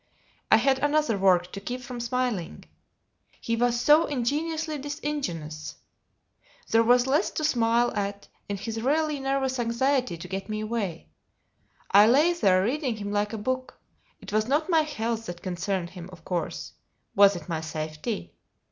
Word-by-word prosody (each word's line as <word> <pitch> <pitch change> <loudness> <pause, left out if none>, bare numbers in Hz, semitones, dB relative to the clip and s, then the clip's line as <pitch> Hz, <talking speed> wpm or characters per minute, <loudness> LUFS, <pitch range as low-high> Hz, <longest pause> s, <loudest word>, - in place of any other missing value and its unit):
I - - +8
had 270 -1 +2
another 290 -4 +2
work 180 -2 +3
to 195 - -6
keep 250 +5 -4
from 250 -1 -7
smiling: 235 -7 -2 0.7
he 230 - -1
was 240 0 +1
so 300 +6 +5
ingenuously 305 +4 -2
disingenuous. 265 - -4 1.0
There 225 - +5
was 245 +2 +4
less 290 +8 +2
to 310 - -4
smile 240 -4 +2
at 200 0 -3 0.2
in 200 - -2
his 225 +3 -4
really 300 +3 +1
nervous 270 -1 -1
anxiety 240 -3 0
to 165 - -8
get 195 +3 -5
me 215 0 -2
away. 210 - -3 0.8
I 205 +2 +8
lay 295 +9 +5
there 190 - +3
reading 260 +2 -1
him 205 -1 -5
like 205 0 0
a 225 - -4
book: 255 +4 -3 0.4
it - - -10
was 215 +1 +2
not 305 +6 +1
my 325 -1 +5
health 230 -7 -3
that 175 0 -7
concerned 180 -1 -2
him, 180 -1 -9
of 170 -3 -14
course: 175 -4 -3 0.4
was 200 0 +6
it 170 -3 -8
my 165 -3 -2
safety? 155 +6 -5
230 Hz, 160 wpm, -26 LUFS, 195-270 Hz, 1.0 s, I